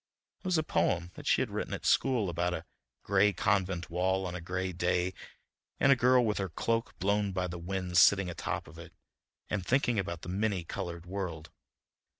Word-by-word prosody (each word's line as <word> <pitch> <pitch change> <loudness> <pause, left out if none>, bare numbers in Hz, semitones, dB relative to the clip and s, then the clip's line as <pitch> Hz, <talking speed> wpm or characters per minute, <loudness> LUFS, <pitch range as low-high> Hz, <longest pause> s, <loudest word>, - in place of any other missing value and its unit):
It - - -28
was 180 -2 +2
a 155 - +2
poem 90 - 0
that - - -10
she - - +4
had - - -6
written - - -3
at - - -9
school 125 -7 +3
about 90 +1 -1
a 80 - -7 0.4
gray 100 +1 +3
convent 95 -4 0
wall 95 +2 +1
on 90 - -4
a 90 - -5
gray 90 +2 -2
day, 90 +1 0 0.7
and 140 - +5
a - - +7
girl 125 -1 +4
with 105 -2 0
her 95 -1 -2
cloak 115 +7 -2
blown 100 0 +1
by 90 -1 -1
the 90 -1 -5
wind 90 0 0
sitting 100 0 +6
atop 90 - -4
of 80 +1 -13
it 85 0 -12 0.5
and 100 -3 -2
thinking 120 +1 +2
about 85 -3 -4
the 90 - -6
many 100 -1 0
colored 85 +1 -6
world. 85 -4 -5
95 Hz, 195 wpm, -31 LUFS, 90-105 Hz, 0.7 s, a